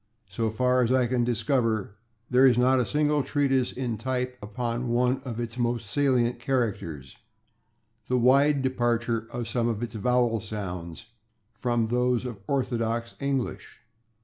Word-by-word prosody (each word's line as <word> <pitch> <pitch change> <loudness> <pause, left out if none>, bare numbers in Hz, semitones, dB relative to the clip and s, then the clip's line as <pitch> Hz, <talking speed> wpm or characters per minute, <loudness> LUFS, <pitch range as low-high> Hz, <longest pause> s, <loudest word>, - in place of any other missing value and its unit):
So 110 +4 -1
far 125 +3 +2
as 120 - 0
I 130 -1 +3
can 120 0 +1
discover, 115 -3 0 0.3
there 130 +1 +5
is 120 -2 +4
not 130 +1 +4
a 125 - 0
single 150 0 +2
treatise 135 -3 +1
in 120 -4 -3
type 125 +1 -2
upon 120 +3 -3
one 125 +2 +1
of 120 -3 -5
its 120 +1 -5
most 120 -1 0
salient 125 -3 +2
characters 100 - -2 0.9
the 125 - +1
wide 140 +3 +4
departure 120 -3 0
of 120 -1 -4
some 120 -2 0
of 115 -1 -2
its 120 - -5
vowel 120 +1 +1
sounds 95 -3 -6 0.5
from 120 -2 0
those 125 +1 +1
of 120 -5 -6
orthodox 115 -3 -1
English. 140 -3 -3
120 Hz, 150 wpm, -26 LUFS, 115-130 Hz, 0.9 s, there